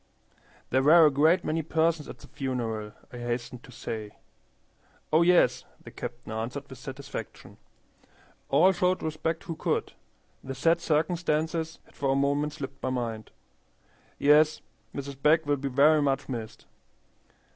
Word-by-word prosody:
"There 130 Hz, -, +3 dB
were 160 Hz, +4 st, +7 dB
a 150 Hz, -, +5 dB
great 160 Hz, +6 st, +3 dB
many 160 Hz, +1 st, 0 dB
persons 160 Hz, 0 st, 0 dB
at -, -, -8 dB
the -, -, -15 dB
funeral," 115 Hz, -5 st, -4 dB, 0.2 s
I 120 Hz, -, -7 dB
hastened 120 Hz, +1 st, -4 dB
to -, -, -14 dB
say. 110 Hz, -3 st, -6 dB, 1.0 s
"Oh 160 Hz, -, +6 dB
yes," 170 Hz, -8 st, +4 dB, 0.2 s
the -, -, -12 dB
captain -, -, -7 dB
answered, 120 Hz, +6 st, -4 dB
with 130 Hz, -2 st, -11 dB
satisfaction. 135 Hz, -4 st, -8 dB, 0.9 s
"All 160 Hz, +8 st, +5 dB
showed 180 Hz, 0 st, 0 dB
respect 160 Hz, +1 st, -2 dB
who 165 Hz, -, -5 dB
could. -, -, -2 dB, 0.5 s
The 135 Hz, 0 st, -6 dB
sad 165 Hz, +5 st, +2 dB
circumstances 160 Hz, 0 st, 0 dB
had -, -, -23 dB
for 140 Hz, -, -2 dB
a -, -, 0 dB
moment 145 Hz, +2 st, +1 dB
slipped 135 Hz, -2 st, -8 dB
my 130 Hz, -, -1 dB
mind. 115 Hz, -4 st, -3 dB, 0.9 s
Yes, 150 Hz, +2 st, +4 dB, 0.3 s
Mrs. 140 Hz, -1 st, -6 dB
Begg 155 Hz, +2 st, +4 dB
will 145 Hz, 0 st, +1 dB
be 140 Hz, +1 st, -3 dB
very 150 Hz, +4 st, +5 dB
much 140 Hz, -1 st, 0 dB
missed. 115 Hz, -4 st, -6 dB
140 Hz, 145 wpm, -28 LUFS, 130-160 Hz, 1.0 s, were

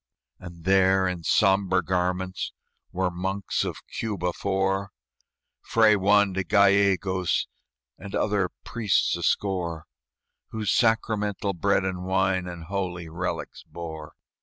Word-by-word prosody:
And 85 Hz, -2 st, -11 dB
there, 95 Hz, 0 st, +4 dB
in 90 Hz, -2 st, -3 dB
sombre 95 Hz, 0 st, +3 dB
garments, 90 Hz, +1 st, -2 dB, 0.4 s
Were 90 Hz, 0 st, -1 dB
monks 95 Hz, +2 st, -2 dB
of -, -, -6 dB
Cuba 95 Hz, -5 st, -3 dB
four, 95 Hz, 0 st, -1 dB, 0.7 s
Fray 110 Hz, -2 st, +4 dB
Juan 100 Hz, 0 st, +3 dB
de 95 Hz, +1 st, -1 dB
Gallegos, 100 Hz, -2 st, +2 dB, 0.5 s
And 100 Hz, 0 st, -7 dB
other 100 Hz, -3 st, +1 dB
priests 115 Hz, -4 st, +1 dB
a -, -, -6 dB
score, 85 Hz, -5 st, -1 dB, 0.6 s
Who 110 Hz, -1 st, -5 dB
sacramental 105 Hz, -3 st, +1 dB
bread 95 Hz, +1 st, +1 dB
and 90 Hz, -1 st, -3 dB
wine 95 Hz, 0 st, +1 dB
And 85 Hz, -2 st, -7 dB
holy 90 Hz, -2 st, -4 dB
relics 85 Hz, +3 st, -4 dB
bore. 80 Hz, -3 st, -9 dB
95 Hz, 115 wpm, -26 LUFS, 90-100 Hz, 0.7 s, there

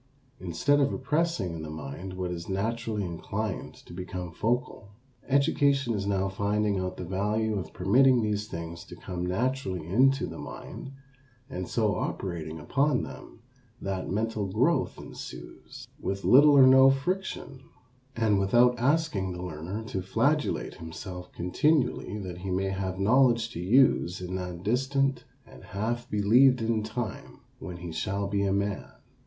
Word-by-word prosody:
Instead 120 Hz, -, +1 dB
of 140 Hz, -1 st, +2 dB
repressing 140 Hz, -, -1 dB
in 80 Hz, -, -6 dB
the 80 Hz, -, -6 dB
mind 80 Hz, +5 st, -7 dB
what 90 Hz, -1 st, -3 dB
is 85 Hz, 0 st, -6 dB
naturally 110 Hz, +1 st, -2 dB
inclined 95 Hz, +4 st, -4 dB
to -, -, -14 dB
become 90 Hz, -1 st, -6 dB
focal, 115 Hz, +2 st, -2 dB, 0.4 s
education 140 Hz, -2 st, +2 dB
is 100 Hz, -2 st, -2 dB
now 95 Hz, -1 st, +1 dB
finding 100 Hz, +1 st, 0 dB
out 95 Hz, 0 st, -3 dB
the -, -, -5 dB
value 105 Hz, +4 st, 0 dB
of 85 Hz, -4 st, -7 dB
permitting 125 Hz, +7 st, +4 dB
these 105 Hz, -1 st, -1 dB
things 85 Hz, -3 st, -6 dB
to -, -, -11 dB
come 90 Hz, -1 st, -5 dB
naturally 95 Hz, -, -1 dB
into 130 Hz, -, +3 dB
the -, -, -8 dB
mind 135 Hz, -, -8 dB, 0.6 s
and 95 Hz, -8 st, -4 dB
so -, -, +1 dB
operating 80 Hz, -4 st, -4 dB
upon 135 Hz, -, +1 dB
them 115 Hz, -, -10 dB, 0.4 s
that 95 Hz, -1 st, -3 dB
mental 110 Hz, 0 st, -1 dB
growth 125 Hz, -, +1 dB
ensues -, -, -10 dB
with 100 Hz, 0 st, -3 dB
little 145 Hz, +2 st, +7 dB
or 135 Hz, -, +9 dB
no 130 Hz, +1 st, +8 dB
friction, 135 Hz, -2 st, -2 dB, 0.5 s
and 110 Hz, -3 st, +2 dB
without 120 Hz, +6 st, +4 dB
asking 130 Hz, -, +1 dB
the 90 Hz, 0 st, -6 dB
learner 90 Hz, +5 st, -5 dB
to 95 Hz, -4 st, -4 dB
flagellate 145 Hz, +10 st, 0 dB
himself 90 Hz, +2 st, -8 dB
continually 120 Hz, -, +1 dB
that 90 Hz, -4 st, -6 dB
he 95 Hz, +1 st, -5 dB
may 95 Hz, +1 st, 0 dB
have 95 Hz, -1 st, -3 dB
knowledge 115 Hz, +2 st, +3 dB
to -, -, -6 dB
use 95 Hz, -3 st, +3 dB
in 90 Hz, 0 st, -6 dB
that 90 Hz, -2 st, -5 dB
distant 135 Hz, +4 st, +1 dB, 0.2 s
and -, -, -15 dB
half 120 Hz, +5 st, -3 dB
believed 120 Hz, +6 st, +5 dB
in 115 Hz, -1 st, 0 dB
time 110 Hz, 0 st, -5 dB, 0.2 s
when 90 Hz, -, -7 dB
he 85 Hz, -1 st, -7 dB
shall 100 Hz, +4 st, -2 dB
be 100 Hz, 0 st, 0 dB
a 100 Hz, -1 st, +1 dB
man. 100 Hz, 0 st, -2 dB
100 Hz, 150 wpm, -28 LUFS, 90-125 Hz, 0.6 s, or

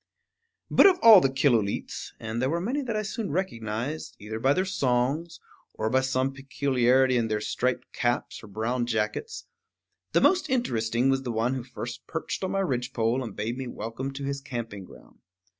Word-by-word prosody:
But -, -, +8 dB
of 375 Hz, -2 st, +4 dB
all 220 Hz, -4 st, +10 dB
the 135 Hz, -, +3 dB
Killooleets, 125 Hz, -7 st, 0 dB
and 115 Hz, +1 st, -4 dB
there 130 Hz, -, +1 dB
were 170 Hz, +3 st, 0 dB
many 245 Hz, +11 st, -1 dB
that 235 Hz, -5 st, -3 dB
I 215 Hz, -, 0 dB
soon 215 Hz, -1 st, -4 dB
recognized, 140 Hz, -, -3 dB
either 110 Hz, +2 st, -6 dB
by 135 Hz, +4 st, +3 dB
their 185 Hz, +5 st, 0 dB
songs, 145 Hz, 0 st, 0 dB, 0.4 s
or 110 Hz, 0 st, -1 dB
by 130 Hz, +1 st, +3 dB
some 130 Hz, 0 st, 0 dB
peculiarity 130 Hz, -2 st, +2 dB
in 115 Hz, -1 st, +1 dB
their 110 Hz, -1 st, -1 dB
striped 125 Hz, +4 st, -2 dB
caps 120 Hz, 0 st, -1 dB
or -, -, -10 dB
brown 115 Hz, +4 st, -2 dB
jackets, 110 Hz, -, -2 dB, 0.7 s
the -, -, +5 dB
most 370 Hz, -1 st, +3 dB
interesting 120 Hz, -, +1 dB
was 135 Hz, 0 st, +1 dB
the 125 Hz, -2 st, -4 dB
one 115 Hz, +3 st, 0 dB
who 130 Hz, -2 st, -3 dB
first 120 Hz, -1 st, -7 dB
perched 160 Hz, +4 st, -4 dB
on 190 Hz, -, -1 dB
my 195 Hz, -, 0 dB
ridgepole 125 Hz, -5 st, 0 dB
and 110 Hz, -5 st, -7 dB
bade 115 Hz, +5 st, -3 dB
me 130 Hz, -, -4 dB
welcome 120 Hz, +4 st, -5 dB
to 140 Hz, +1 st, -6 dB
his 140 Hz, 0 st, -3 dB
camping 115 Hz, -7 st, -6 dB
ground. -, -, -17 dB
130 Hz, 185 wpm, -27 LUFS, 115-145 Hz, 0.7 s, all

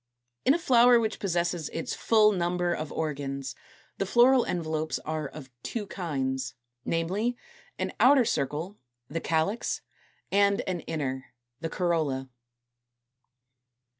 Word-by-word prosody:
In 270 Hz, -, +6 dB
a -, -, +2 dB
flower 245 Hz, -6 st, +6 dB
which 220 Hz, -1 st, -2 dB
possesses 175 Hz, -3 st, -1 dB
its 165 Hz, -, -4 dB
full 215 Hz, -2 st, +4 dB
number 175 Hz, -2 st, 0 dB
of 155 Hz, -2 st, -4 dB
organs, 140 Hz, -4 st, -3 dB, 0.5 s
the 195 Hz, -, +1 dB
floral 245 Hz, +4 st, +6 dB
envelopes 160 Hz, -2 st, -1 dB
are 155 Hz, -1 st, -2 dB
of 135 Hz, -2 st, -11 dB
two 220 Hz, -, -4 dB
kinds, 135 Hz, -9 st, -3 dB, 0.3 s
namely, 195 Hz, +9 st, -1 dB, 0.4 s
an -, -, -2 dB
outer 265 Hz, -1 st, +6 dB
circle, 160 Hz, -, -2 dB, 0.3 s
the 165 Hz, +3 st, -3 dB
CALYX, 165 Hz, +8 st, 0 dB, 0.5 s
and 200 Hz, 0 st, +4 dB
an 185 Hz, -2 st, -3 dB
inner, 135 Hz, -6 st, -3 dB, 0.2 s
the 165 Hz, +1 st, -3 dB
COROLLA. 155 Hz, -7 st, 0 dB
170 Hz, 120 wpm, -28 LUFS, 150-210 Hz, 0.5 s, In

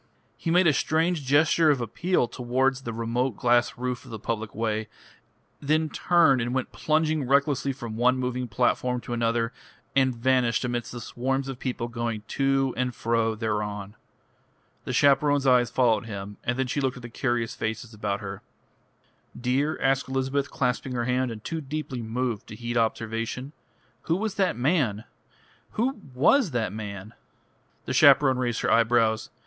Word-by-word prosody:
He -, -, -4 dB
made 180 Hz, +2 st, +4 dB
a 155 Hz, -, +5 dB
strange 160 Hz, +2 st, +1 dB
gesture 155 Hz, +3 st, +4 dB
of 145 Hz, -3 st, +3 dB
appeal 125 Hz, -, 0 dB
towards 130 Hz, +3 st, 0 dB
the 120 Hz, -, -5 dB
remote 115 Hz, +1 st, -1 dB
glass 120 Hz, 0 st, +2 dB
roof 125 Hz, -1 st, -3 dB
of 130 Hz, -, -14 dB
the 115 Hz, -, -6 dB
public 110 Hz, 0 st, -4 dB
way, 110 Hz, -1 st, -1 dB, 0.7 s
then 155 Hz, +2 st, +1 dB
turned 150 Hz, -6 st, +3 dB
and 120 Hz, +2 st, -2 dB
went 130 Hz, -, -2 dB
plunging 155 Hz, -3 st, 0 dB
recklessly 140 Hz, 0 st, +2 dB
from 120 Hz, -4 st, -7 dB
one 125 Hz, +2 st, +3 dB
moving 125 Hz, 0 st, -2 dB
platform 125 Hz, +2 st, 0 dB
to 120 Hz, -, -6 dB
another, 115 Hz, 0 st, 0 dB, 0.4 s
and 130 Hz, -2 st, +3 dB
vanished 125 Hz, 0 st, +1 dB
amidst 120 Hz, -1 st, -3 dB
the 120 Hz, -, -7 dB
swarms 135 Hz, +3 st, -2 dB
of 135 Hz, -2 st, -6 dB
people 125 Hz, -3 st, -3 dB
going 115 Hz, -2 st, -3 dB
to 135 Hz, -1 st, +1 dB
and 125 Hz, -1 st, -2 dB
fro 115 Hz, -1 st, 0 dB
thereon. 105 Hz, -2 st, -3 dB, 0.9 s
The -, -, -3 dB
chaperone's 145 Hz, +1 st, +3 dB
eyes 125 Hz, -2 st, +4 dB
followed 115 Hz, -3 st, +2 dB
him, 100 Hz, -1 st, -7 dB
and 125 Hz, +1 st, -1 dB
then 130 Hz, -, +1 dB
she 135 Hz, +3 st, -2 dB
looked 130 Hz, -1 st, -1 dB
at 125 Hz, -, -11 dB
the -, -, -6 dB
curious 120 Hz, -1 st, -1 dB
faces 110 Hz, +1 st, -4 dB
about 105 Hz, 0 st, -3 dB
her. 95 Hz, -2 st, -6 dB, 1.0 s
"Dear," 135 Hz, +5 st, 0 dB
asked 135 Hz, 0 st, +1 dB
Elizabeth, 135 Hz, +1 st, -1 dB
clasping 125 Hz, 0 st, -1 dB
her 120 Hz, -1 st, -1 dB
hand, 125 Hz, +1 st, 0 dB
and 110 Hz, -2 st, -8 dB
too 165 Hz, -1 st, -4 dB
deeply 145 Hz, -3 st, -5 dB
moved 115 Hz, -1 st, -3 dB
to 110 Hz, -, -9 dB
heed 120 Hz, +1 st, -5 dB
observation, 115 Hz, +4 st, -2 dB, 0.5 s
"who 165 Hz, -, +1 dB
was 210 Hz, +2 st, -2 dB
that 190 Hz, -, 0 dB
man? 125 Hz, -, +1 dB, 0.7 s
Who 245 Hz, 0 st, -1 dB
was 210 Hz, -, +4 dB
that 110 Hz, -5 st, -1 dB
man?" 105 Hz, -1 st, -7 dB, 0.7 s
The -, -, -3 dB
chaperone 130 Hz, -3 st, +6 dB
raised 120 Hz, -2 st, -1 dB
her -, -, +1 dB
eyebrows. 115 Hz, -1 st, +3 dB
125 Hz, 165 wpm, -26 LUFS, 115-135 Hz, 1.0 s, chaperone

